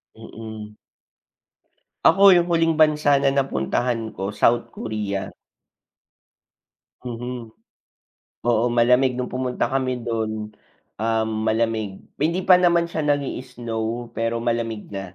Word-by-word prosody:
Mm. 110 -1 -10 1.3
Ako 200 +1 +7
'yong 175 -2 +5
huling 165 -1 +2
bansa 150 -2 +4
na 135 0 +2
napuntahan 120 - -1
ko, 95 +1 -4
South 115 +3 +2
Korea. 105 -3 -4 1.7
Mhm. 120 -1 -6 1.0
Oo, 115 0 +3
malamig 125 +2 +4
no'ng 125 0 -3
pumunta 125 -1 -1
kami 130 -2 -1
do'n, 110 -2 -3 0.5
um, 110 0 0 0.2
malamig. 110 -3 -1 0.2
Hindi 170 +5 +1
pa 180 - +9
naman 170 -1 +3
siya 155 -2 -2
nag-i-snow, 120 -4 -3
pero 115 0 -1
malamig 115 -2 -2
na. 95 -2 -7
120 Hz, 105 wpm, -22 LUFS, 110-135 Hz, 1.7 s, pa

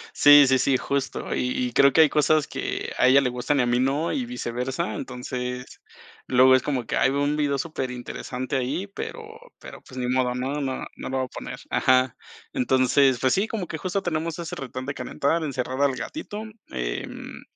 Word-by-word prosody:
Sí, 145 -1 +8
sí, 130 0 +3
sí, 130 0 +3
justo. 140 0 -3
Y 125 0 -1
y - - -15
creo 140 +1 +6
que 160 - +5
hay 155 - +6
cosas 150 0 +2
que - - -4
a - - +5
ella 135 +2 +7
le 130 -2 +1
gustan 125 +4 -1
y - - +4
a - - +1
mí 120 0 +1
no, 140 +5 0
y 255 -4 -2
viceversa. 125 - -3
Entonces, 125 +1 -6 0.5
luego 130 +1 +6
es 130 - +3
como 130 -5 -2
que, - - -2
ay, - - +3
veo 140 +1 0
un 145 +1 +1
video 145 -2 0
superinteresante 130 -2 -4
ahí, 135 +9 -1
pero 440 - -7 0.4
pero, - - -11
pues, 130 - -13
ni 125 - -2
modo. 125 -1 +1
No, 135 +4 -2
no, 130 -1 -3
no - - -6
lo 130 - -2
voy 130 - 0
a - - -10
poner - - -7
ajá. 130 -1 +3 0.4
Entonces, 130 +1 +3
pues 130 -1 +2
sí, 200 +3 +1
como 210 -6 -3
que 160 - -5
justo 185 +2 -2
tenemos 165 -1 -2
ese 170 -2 -5
retón 130 -1 -6
de 140 - -3
calentar, 160 +5 -1
encerrar 130 -1 -3
al 140 -2 +3
gatito, 220 - -6 0.3
em, - - -5
135 Hz, 205 wpm, -25 LUFS, 125-150 Hz, 0.5 s, Sí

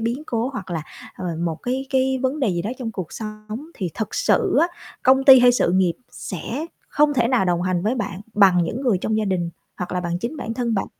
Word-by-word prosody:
biến 235 +6 -2
cố 235 +2 -1
hoặc 190 -7 -6
là, 165 -3 -2 0.3
ờ, 185 - -6 0.2
một, 165 -2 -1
cái 260 +2 -2
cái, 265 0 +2
vấn 270 +3 0
đề 255 - +2
gì 175 -2 -1
đó 215 - -3
trong 230 -3 -4
cuộc 185 -4 -6
sống, 215 +5 -7
thì 180 -4 -3
thật 220 - -4
sự - - +2
á, 335 - +5 0.4
công 265 +1 +4
ty 265 -2 +10
hay 245 0 +6
sự 205 - +2
nghiệp 185 -3 +3 0.2
sẽ 235 - -5 0.2
không 295 0 +3
thể 235 -3 +2
nào 250 -7 +3
đồng 175 -1 +1
hành 180 -1 0
với 220 +5 +1
bạn 200 -5 -4
bằng 190 -4 +5
những 220 +10 -3
người 225 -8 +2
trong 220 +3 -1
gia 215 - 0
đình 180 -3 -1 0.3
hoặc 180 - -5
là 180 - 0
bằng 175 0 -2
chính 240 - -4
bản 225 -4 -4
thân 235 -2 -1
bạn, 195 - -1
220 Hz, 245 wpm, -22 LUFS, 185-255 Hz, 0.4 s, ty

